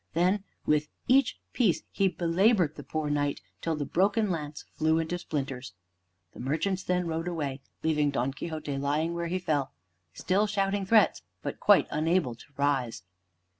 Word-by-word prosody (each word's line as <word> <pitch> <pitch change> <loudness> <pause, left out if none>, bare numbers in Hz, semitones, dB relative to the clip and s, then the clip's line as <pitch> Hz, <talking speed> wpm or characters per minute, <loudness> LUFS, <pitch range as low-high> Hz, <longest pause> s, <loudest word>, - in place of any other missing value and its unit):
Then 185 +4 +2 0.2
with 150 0 +2 0.2
each 270 +2 +4 0.2
piece 215 -10 +2
he 195 - +2
belabored 180 0 +2
the - - -9
poor 155 -2 -2
Knight 145 -1 0 0.2
till 165 -1 0
the 145 -1 -2
broken 200 +6 +2
lance 150 -3 -4
flew 160 +1 +2
into 165 +2 -1
splinters. 135 - -4 0.6
The - - -12
merchants 165 +9 -1
then 180 -1 0
rode 165 +1 -2
away, 145 -6 -3 0.2
leaving 150 -2 +2
Don 135 -1 -1
Quixote 155 -2 -4
lying 150 +4 0
where 170 0 -2
he 180 +2 -1
fell, 155 -7 -1 0.4
still 185 - +1
shouting 195 -1 0
threats, 215 - +4 0.2
but - - -4
quite - - +6
unable 160 -3 +1
to 115 - -14
rise. 135 -9 0
160 Hz, 160 wpm, -29 LUFS, 145-185 Hz, 0.6 s, quite